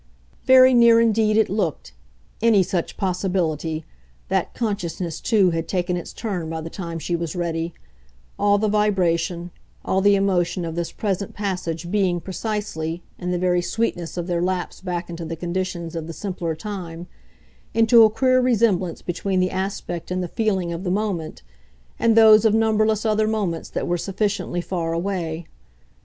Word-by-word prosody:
Very 260 0 +7
near 235 -1 +6
indeed 220 -2 +3
it 220 - +4
looked, 175 - -2 0.5
any 220 -4 +5
such 175 -1 -3
possibility! 175 -4 -1 0.4
that - - -1
consciousness, 180 -7 -3
too, 200 -6 +3
had 165 0 -2
taken 180 -1 -1
its 175 - -5
turn 180 -7 -4
by 160 0 -3
the 165 +1 -7
time 170 -3 -5
she 170 +2 -2
was 170 -1 -4
ready; 170 -1 -2 0.6
all 205 0 +4
the 215 +1 +1
vibration, 180 -4 +1 0.3
all 190 - +1
the 200 +1 +5
emotion 185 -3 +1
of 165 - -4
this 170 0 -3
present 200 -2 -3
passage 180 -4 -3
being, 190 -4 +1
precisely, 180 -4 -4 0.2
in 180 - -4
the 180 - 0
very 180 0 +2
sweetness 175 -4 -2
of 175 - -2
their 175 -1 -1
lapse 180 0 -2
back 180 -2 -3
into 170 -1 -6
the 165 0 -4
conditions 175 0 -4
of 165 -1 -4
the 165 - -6
simpler 175 -4 -3
time, 175 -2 -6 0.7
into 230 +1 +6
a 220 - +8
queer 255 +3 +3
resemblance 215 -8 +1
between 185 +2 -1
the 185 0 +1
aspect 185 -3 -4
and 185 0 -1
the - - -3
feeling 190 -4 -1
of 170 +2 -5
the 185 - -2
moment 190 -5 -2 0.6
and 230 -1 +3
those 220 -2 +8
of 220 -1 +4
numberless 220 -1 +2
other 215 0 +2
moments 200 -7 -2
that - - -3
were 175 0 0
sufficiently 195 -2 -2
far 170 -2 -2
away. 170 -2 -3
185 Hz, 165 wpm, -22 LUFS, 170-210 Hz, 0.7 s, a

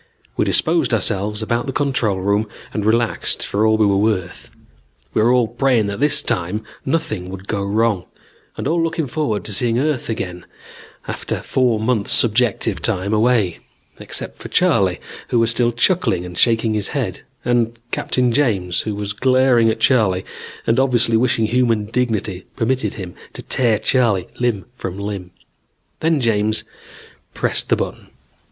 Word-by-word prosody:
We - - +1
disposed - - +2
ourselves 105 +2 0
about 120 +3 -1
the - - -1
control 130 -8 0
room 100 +2 +1 0.2
and 105 - -2
relaxed 115 +2 +1
for 105 +2 +1
all 110 0 +3
we 110 - +4
were 100 -1 +3
worth. 100 -4 -1 0.6
We - - +2
were 115 +3 +4
all 125 -2 +3
praying 120 -1 +1
that 100 +1 -4
this 150 +1 +2
time 105 -1 -1 0.2
nothing 110 - -2
would 95 +1 -9
go 100 -2 -1
wrong, 105 -1 0 0.5
and - - -3
all 170 +1 +1
looking 165 -1 -1
forward 135 -7 -2
to 105 - -3
seeing 115 +3 +1
Earth 140 -2 -1
again 90 -5 -4 0.6
after - - -4
four 125 -4 +1
months 110 -2 0
subjective 120 0 +2
time 95 +3 0
away, 110 -5 +2 0.4
except - - -4
for - - -9
Charley, - - +2 0.3
who 120 - 0
was 115 0 +3
still 120 0 +2
chuckling 115 - +1
and 90 0 -8
shaking 115 +2 +3
his 105 -2 -1
head, - - -3 0.2
and 120 -1 +1
Captain 125 -1 0
James 100 -10 +1
who 105 -2 -4
was 105 0 -3
glaring 130 0 +3
at 110 - -1
Charley 100 -8 +2 0.4
and 115 +3 +2
obviously 125 -3 +2
wishing 115 -1 +2
human 115 -2 +1
dignity 105 -5 -2
permitted 130 +3 0
him 95 -4 -7 0.2
to - - -7
tear 115 -4 +2
Charley 110 -4 +1
limb 120 -5 0
from 95 -6 -6
limb. 100 -3 -5 0.7
Then 160 -1 +2
James 110 -3 +1 0.7
pressed - - -1
the - - +4
button. - - -5
110 Hz, 160 wpm, -19 LUFS, 100-125 Hz, 0.7 s, we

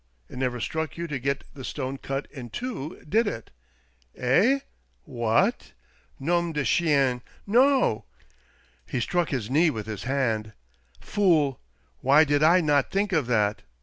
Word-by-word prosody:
"It - - -8
never 125 -2 -1
struck 160 +7 -3
you 170 - -3
to 150 -5 -4
get 140 +2 -2
the 135 - -10
stone 135 0 -4
cut 135 +1 -4
in 125 -4 -8
two, 185 - -6
did 220 +7 +2
it?" 115 - -5 0.7
"Eh? 215 - +3 0.4
What?— 120 - 0 0.5
^ow 170 +4 0
de 150 -2 -1
chien! 135 0 +2 0.2
No!" 245 - +3 0.8
He - - -2
struck 175 +8 0
his 125 -4 -3
knee 160 +4 +4
with 110 -7 -4
his 110 0 -6
hand. 115 -5 -1 0.5
"Fool! 160 - +2 0.4
Why 140 +4 +5
did 145 -1 +1
I 170 +4 +5
not 145 -3 +2
think 200 +1 0
of 155 -7 +1
that 105 -3 +1
140 Hz, 150 wpm, -26 LUFS, 125-170 Hz, 0.8 s, Why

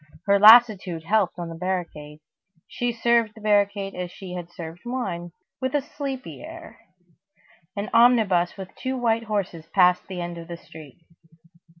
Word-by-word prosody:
Her 200 -1 +4
lassitude 210 -6 +6
helped 200 +1 +1
on 170 -1 -5
the - - -7
barricade. 165 -4 -5 0.5
She 245 0 -2
served 230 -2 +1
the - - -13
barricade 200 -1 +1
as 180 -1 -5
she 185 0 -10
would 175 -1 -5
have 170 - -28
served 165 0 -8
wine, 190 -9 -4 0.3
with 260 +2 -2
a 290 - +2
sleepy 275 -2 -6
air. 330 +1 -11 1.0
An 205 +1 -3
omnibus 220 -8 +4
with 190 -1 -9
two 260 0 -4
white 230 -2 0
horses 190 -6 -3
passed 180 -2 +3
the 185 -2 -6
end 175 -1 -5
of 165 - -10
the 170 -1 -7
street. 155 -4 -14
195 Hz, 165 wpm, -24 LUFS, 175-230 Hz, 1.0 s, lassitude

